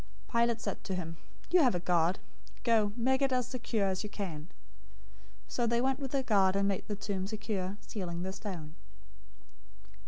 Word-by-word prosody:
027:065 235 - +3
Pilate 235 -1 +3
said 200 - -3
to 190 -1 -2
them, 165 -2 -4 0.3
"You 360 0 +7
have 250 -9 +4
a - - +1
guard. 175 0 +2 0.5
Go, 220 -3 +4
make 260 +3 +2
it 270 -1 +3
as 250 -1 +2
secure 230 -5 -1
as 190 +1 -1
you 210 - -4
can." 170 -6 -5 1.0
027:066 - - -28
So 240 - +2
they 235 +1 +2
went 265 +2 +1
with 270 -2 -3
the 275 -1 +2
guard 195 -5 +4
and 200 0 +3
made 195 -2 -1
the 210 - -2
tomb 200 -2 -2
secure, 205 -2 -3
sealing 175 -4 -4
the 190 +1 -3
stone. 175 -7 -6
205 Hz, 190 wpm, -32 LUFS, 185-235 Hz, 1.0 s, You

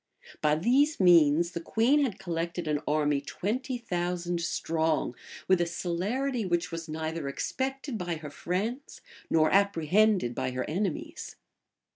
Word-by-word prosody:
By 150 0 +3
these 265 - +2
means, 170 -2 +5
the 170 - -4
queen 240 - +3
had 255 -8 -1
collected 170 -2 -3
an 150 -1 0
army 150 -1 +1
twenty 245 - -3
thousand 175 -5 -2
strong, 160 -5 0 0.3
with 185 -2 +4
a 170 - +1
celerity 210 +10 -2
which 175 -2 -1
was 165 -1 -6
neither 160 -1 -3
expected 265 - -3
by 175 -1 -2
her 155 -2 -8
friends 195 - -3 0.3
nor 155 -1 +3
apprehended 200 - +3
by 130 +1 -2
her 125 - -3
enemies. 215 - -3
175 Hz, 135 wpm, -28 LUFS, 160-220 Hz, 0.3 s, means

